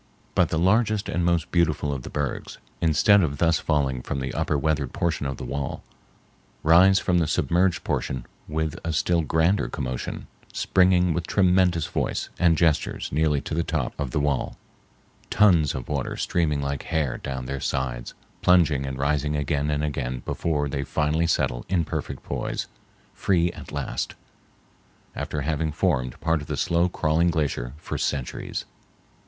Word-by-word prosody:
But - - +3
the 80 - -1
largest 105 +4 +2
and 90 - 0
most 85 -1 +1
beautiful 75 -4 +1
of 65 - -4
the - - -8
bergs, 75 -1 -3 0.2
instead 85 +5 +5
of 70 -5 -1
thus 80 +1 +3
falling 70 -5 0
from 70 - -3
the 65 0 -4
upper 75 - 0
weathered 75 -2 0
portion 80 -4 -1
of 65 - -4
the - - -6
wall, 70 -1 -4 0.8
rise 90 +4 +6
from 90 -3 +2
the 80 - +1
submerged 85 +6 +1
portion 65 -2 -2 0.2
with 80 -1 -2
a 85 - -2
still 85 +2 +2
grander 80 +6 +2
commotion, 65 -5 -4 0.3
springing 90 -2 +3
with 85 0 -3
tremendous 90 -4 +3
voice - - -2
and 85 -3 +4
gestures 80 -2 +1
nearly 75 -1 +2
to - - -6
the 85 - +1
top 80 -6 -2
of 70 -3 -2
the 65 - -1
wall, 70 -3 -1 0.7
tons 90 -9 +4
of 65 -2 -5
water 70 -4 -2
streaming 75 -5 0
like 70 0 -2
hair 75 -6 -1
down 65 -1 -5
their 70 +2 -4
sides, 60 -2 -3 0.3
plunging 80 -7 +4
and 65 -1 -4
rising 75 +1 0
again 75 0 0
and 75 0 0
again 65 -4 -3
before 75 -3 -1
they 70 0 -2
finally 75 +4 0
settle - - 0
in 85 -4 +1
perfect - - -5
poise, - - -3 0.5
free 85 -3 +1
at - - -11
last, - - -3 1.0
after 75 - -3
having 80 +1 -1
formed 65 -4 0
part 80 -2 +1
of 75 - -9
the - - -3
slow 85 +1 +2
crawling 85 0 +2
glacier 70 -7 -1
for - - -5
centuries. 70 -4 -3
75 Hz, 165 wpm, -25 LUFS, 70-85 Hz, 1.0 s, rise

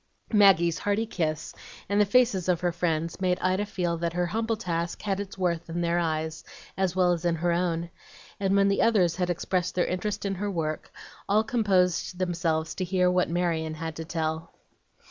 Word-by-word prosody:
Maggie's 180 -5 +5
hearty 205 +2 0
kiss, 155 -7 -3 0.3
and 205 +1 +2
the - - +5
faces 205 -6 +3
of 175 -2 +2
her 175 -1 +1
friends, 165 0 -2
made 180 -1 +2
Ida 185 +3 0
feel 175 -4 -1
that 170 0 -2
her 175 0 0
humble 225 +5 -1
task 170 -4 -3
had 195 -2 -1
its 200 -1 -6
worth 170 -2 -1
in 170 +1 -2
their 170 0 +1
eyes, 160 -1 -2 0.3
as 190 -2 0
well 180 -1 +4
as 170 -1 -4
in 170 -1 +1
her 170 +2 0
own; 170 -1 -1 0.5
and 195 0 +1
when 200 0 +4
the 200 - +2
others 185 -8 +3
had 180 -1 0
expressed 180 +1 -1
their 175 - +2
interest 205 +3 -3
in 195 - 0
her 205 +2 -3
work, 155 -5 -3 0.4
all 210 +2 +4
composed 190 -6 +1
themselves 170 -3 -1
to 185 - -3
hear 180 0 +2
what 180 0 +1
Marion 165 -2 -1
had 160 0 -5
to 160 - -4
tell. 160 0 -3
180 Hz, 195 wpm, -27 LUFS, 165-195 Hz, 0.5 s, Maggie's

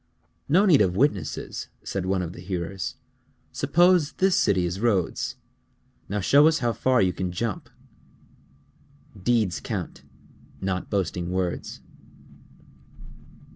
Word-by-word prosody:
"No 185 +8 +5
need 165 - +5
of 90 -3 +2
witnesses," 100 - -1 0.2
said 95 -2 -3
one 95 -1 0
of 85 0 -6
the - - -11
hearers. 90 0 -4 0.6
"Suppose 175 -3 +3
this 190 -1 +2
city 95 -4 +2
is 90 +2 -3
Rhodes. 105 -6 0 0.7
Now 105 +2 -1
show 145 +10 +6
us 160 0 +3
how 120 -5 0
far 130 -3 +2
you 90 -1 +1
can 90 -1 -3
jump." 105 +3 -4 1.5
_Deeds 105 -2 0
count, - - -5 0.6
not 95 -1 -3
boasting 90 -3 -2
words. 90 -1 -3
100 Hz, 120 wpm, -25 LUFS, 90-130 Hz, 1.5 s, show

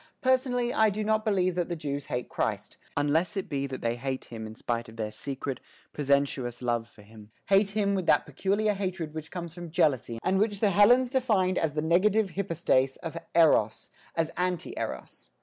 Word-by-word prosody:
Personally, 255 -2 +1
I 220 0 +4
do 210 +1 -3
not 215 0 +1
believe 185 -4 +1
that 175 0 -2
the 175 - -2
Jews 145 -3 -4
hate 125 0 -3
Christ, - - -3 0.2
unless 160 +8 +1
it 195 - -2
be 140 -1 -2
that 130 -1 -6
they 115 +1 -1
hate 130 +1 -4
Him 110 -2 -7
in 110 - -10
spite 115 0 -3
of 110 - -13
their 110 -2 -3
secret, 135 +3 -5 0.3
presensuous 140 -4 0
love 120 -2 0
for 105 - -17
Him, 105 0 -15 0.2
hate 195 +1 +4
Him 200 -1 +2
with 190 -3 -2
that - - +4
peculiar 205 +2 0
hatred 185 -5 -3
which 155 -1 -6
comes 170 -3 -6
from 175 -1 -8
jealousy 150 - +1
and 190 +1 +2
which 205 -1 +1
the 205 -2 +3
Hellenes 240 +6 +5
defined 210 -9 +2
as 160 -3 0
the 150 0 -1
negative 190 +5 +3
hypostase 165 -8 +1
of 165 -1 -5 0.2
Eros, 150 -10 +3 0.2
as 165 -1 0
anti 180 -1 -1
Eros. - - -6
170 Hz, 195 wpm, -28 LUFS, 135-200 Hz, 0.3 s, Hellenes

